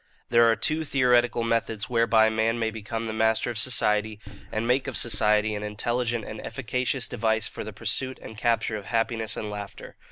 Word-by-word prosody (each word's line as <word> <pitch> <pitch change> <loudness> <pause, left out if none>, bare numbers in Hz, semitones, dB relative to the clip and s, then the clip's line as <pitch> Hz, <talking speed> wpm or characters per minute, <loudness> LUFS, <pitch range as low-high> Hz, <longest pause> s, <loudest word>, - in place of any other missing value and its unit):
"There 115 0 +5
are 115 - +4
two 155 +9 0
theoretical 125 -4 +2
methods 115 -2 -1
whereby 115 -2 +4
man 110 +1 0
may 110 -1 -1
become 110 +1 -5
the 110 - -4
master 110 +2 +1
of 115 - -3
society, 110 -3 +1 0.3
and 110 +2 -2
make 130 +3 +2
of 135 - -3
society 105 -1 +2
an 105 - -4
intelligent 120 +2 -2
and 110 - -7
efficacious 125 +1 -2
device 110 +1 0
for - - -7
the 110 - -7
pursuit 115 +5 -2
and 110 - -10
capture 115 -1 0
of 100 - -9
happiness 115 0 -1
and 105 -1 -4
laughter. 100 -1 -8
115 Hz, 185 wpm, -26 LUFS, 110-120 Hz, 0.3 s, There